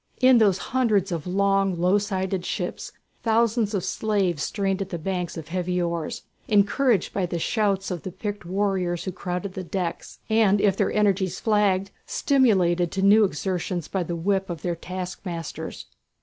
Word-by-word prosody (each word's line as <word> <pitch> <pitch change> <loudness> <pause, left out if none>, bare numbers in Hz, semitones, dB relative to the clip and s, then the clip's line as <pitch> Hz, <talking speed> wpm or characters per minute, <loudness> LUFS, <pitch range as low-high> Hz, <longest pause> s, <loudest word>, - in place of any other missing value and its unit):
In 255 -2 +6
those 200 -4 +4
hundreds 215 -5 +1
of 165 -1 -3
long, 195 -1 +1
low 180 +4 +3
sided 190 -2 -2
ships - - -4 0.3
thousands 225 -1 +2
of 185 - -1
slaves 195 -8 0
strained 195 +2 -1
at 195 - -4
the 175 - -3
banks 180 +1 -3
of 160 -1 -8
heavy 180 0 -1
oars, 170 -2 -2 0.2
encouraged 210 +1 +2
by 190 -3 0
the 175 - -3
shouts 195 +1 0
of 175 -3 -3
the - - -5
picked 205 +2 -5
warriors 185 -2 -1
who 190 - -3
crowded 180 +1 -4
the 185 - -5
decks, 180 -1 -4
and 220 -3 +3
if 195 -2 +3
their - - +1
energies 195 -3 +1
flagged, 200 -3 +2 0.2
stimulated 185 - +2
to 195 - -1
new 210 +2 +6
exertions 180 0 -2
by 190 - -2
the 175 0 -3
whip 190 +3 0
of 170 -3 -6
their 175 -1 -1
taskmasters. 180 -1 -6
190 Hz, 165 wpm, -25 LUFS, 180-205 Hz, 0.3 s, In